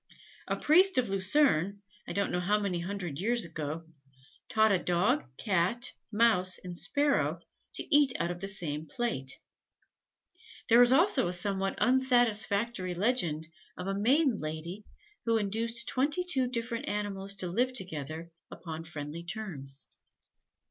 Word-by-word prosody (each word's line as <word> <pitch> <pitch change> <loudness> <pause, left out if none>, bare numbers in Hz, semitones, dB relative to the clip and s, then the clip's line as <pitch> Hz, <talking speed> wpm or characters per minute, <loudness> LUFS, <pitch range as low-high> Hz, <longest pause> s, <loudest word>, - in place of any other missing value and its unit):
A - - 0
priest 365 +4 +4
of 245 -4 +2
Lucerne, 200 - +2 0.2
I - - -4
don't 200 0 0
know 180 - 0
how 205 +4 +1
many 195 -4 -2
hundred 175 -4 -5
years 235 +3 +1
ago, 160 0 -5 0.6
taught 220 -1 +4
a 190 - +3
Dog, 180 +11 +1
Cat, 200 +4 0 0.2
Mouse 210 -5 +2
and 180 -1 -8
Sparrow, 285 +11 0 0.4
to 310 - +2
eat 290 -3 +6
out 170 - 0
of 175 0 -7
the 195 - -3
same 160 -5 -4
plate. 185 - -3 1.3
There 235 +1 +7
is 245 0 +6
also 290 - +4
a 175 - -2
somewhat 195 +1 0
unsatisfactory 235 -6 +2
legend 175 -7 0 0.3
of 180 - -5
a 195 - -1
maiden 250 +5 +2
lady 160 +6 -6 0.4
who 230 0 +3
induced 225 +3 0
twenty 290 +7 +1
two 270 -8 +1
different 235 -1 -3
animals 200 -1 -3
to 190 -2 -2
live 245 +9 +1
together 165 - -4 0.2
upon 165 -1 -7
friendly 155 0 -6
terms. 170 -9 -1
200 Hz, 140 wpm, -30 LUFS, 175-240 Hz, 1.3 s, There